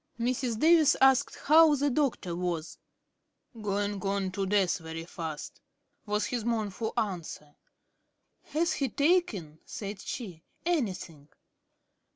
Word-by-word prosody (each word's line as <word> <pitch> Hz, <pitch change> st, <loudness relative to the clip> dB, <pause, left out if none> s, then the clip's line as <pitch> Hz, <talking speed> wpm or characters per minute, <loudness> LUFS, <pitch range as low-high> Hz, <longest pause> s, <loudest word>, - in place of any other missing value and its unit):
Mrs. 245 Hz, -1 st, -1 dB
Davis 315 Hz, -1 st, +5 dB
asked 265 Hz, +1 st, +4 dB
how 310 Hz, 0 st, +7 dB
the 285 Hz, 0 st, +1 dB
Doctor 245 Hz, -, 0 dB
was. 175 Hz, -2 st, -3 dB, 0.8 s
"Going 205 Hz, -1 st, -1 dB
on 195 Hz, -1 st, -1 dB
to 195 Hz, 0 st, -2 dB
death 195 Hz, -2 st, +2 dB
very 165 Hz, 0 st, -7 dB
fast," 160 Hz, -3 st, -7 dB, 0.5 s
was 210 Hz, +1 st, 0 dB
his 240 Hz, -3 st, -2 dB
mournful 220 Hz, -1 st, -2 dB
answer. 170 Hz, -7 st, -3 dB, 0.9 s
"Has 335 Hz, +3 st, 0 dB
he 275 Hz, -2 st, -1 dB
taken," 225 Hz, -, +1 dB
said 200 Hz, -2 st, -6 dB
she, 185 Hz, -10 st, -6 dB, 0.2 s
"anything?" 185 Hz, -, -2 dB
205 Hz, 115 wpm, -29 LUFS, 180-270 Hz, 0.9 s, how